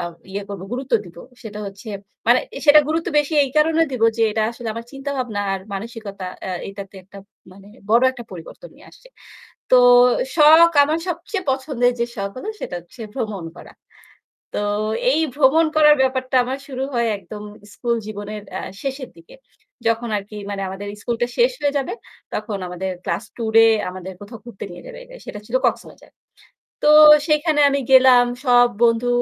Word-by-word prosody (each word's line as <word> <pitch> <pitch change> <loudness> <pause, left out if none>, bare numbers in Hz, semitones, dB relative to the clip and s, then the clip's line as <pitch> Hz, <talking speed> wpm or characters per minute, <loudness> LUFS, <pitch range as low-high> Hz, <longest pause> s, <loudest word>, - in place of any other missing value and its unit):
আ - - -3 0.3
ইয়া 200 +1 -4
করব, 195 -2 -7
গুরুত্ব 260 +2 -5
দিব 175 -1 -15 0.3
সেটা 210 -2 -8
হচ্ছে 200 +3 -10 0.4
মানে 245 +1 +5 0.2
এ - - -3
সেটা 300 +1 +8
গুরুত্ব 325 +3 -1
বেশি 295 +2 -1
এই 270 - -6
কারণে 320 +2 +3
দিব 245 - -4
যে 230 - +1
এটা 220 0 0
আসলে 235 -1 -7
আমার 230 0 -6
চিন্তাভাবনা 270 -6 -4
আর 190 - -5
মানসিকতা 200 -2 -7 0.2
অ্যা 190 - -4 0.2
এটাতে 195 0 -9
একটা 200 +2 -14 0.3
মানে 195 +1 -16 0.2
বড় 235 +2 +5
একটা 240 -2 -10
পরিবর্তন 180 - -11
নিয়ে - - -18
আসছে। - - -18 0.6
তো 255 - +7 0.6
শখ 320 +2 +7
আমার 310 +3 -1
সবচেয়ে 360 +3 -4
পছন্দের 260 -2 0
যে - - +3
শখ 200 -1 -3
হলো 420 - -7
সেটা 175 - -5
হচ্ছে 175 +8 -18
ভ্রমণ 215 -9 -4
করা। - - -13 0.8
তো - - -1 0.5
এই 305 +4 +2
ভ্রমণ 300 +3 +4
করার 300 -1 +7
ব্যাপারটা 260 0 -1
আমার 260 +2 -4
শুরু 260 -1 -5
হয় 235 -1 +1
একদম 205 +3 -10 0.3
স্কুল 235 -1 -1
জীবনের 210 0 -7
অ্যা 190 - -5 0.2
শেষের 270 -2 -5
দিকে। 165 - -16 0.5
যখন 230 +1 -1
আরকি 205 +2 -11
মানে 195 -1 -4
আমাদের 195 +2 -7
স্কুলটা 240 0 -1
শেষ 485 +1 +4
হয়ে 285 0 0
যাবে 270 - -3 0.4
তখন 210 -1 -4
আমাদের 185 +1 -4
class - - -2
tour-এ 225 -1 +4 0.2
আমাদের 185 +1 -8
কোথাও 220 +3 -10
ঘুরতে 235 -5 -9
নিয়ে - - -11
যাবে। - - -10
এটা - - -13
সেটা 210 - -7
ছিল 235 - -1
কক্সবাজার। - - -4 0.7
তো - - +3 0.4
সেইখানে 305 0 +2
আমি 280 - 0
গেলাম। 260 -2 +7 0.2
সব 245 -1 +5 0.2
বন্ধু 230 +1 +2
240 Hz, 175 wpm, -20 LUFS, 205-280 Hz, 0.8 s, সেটা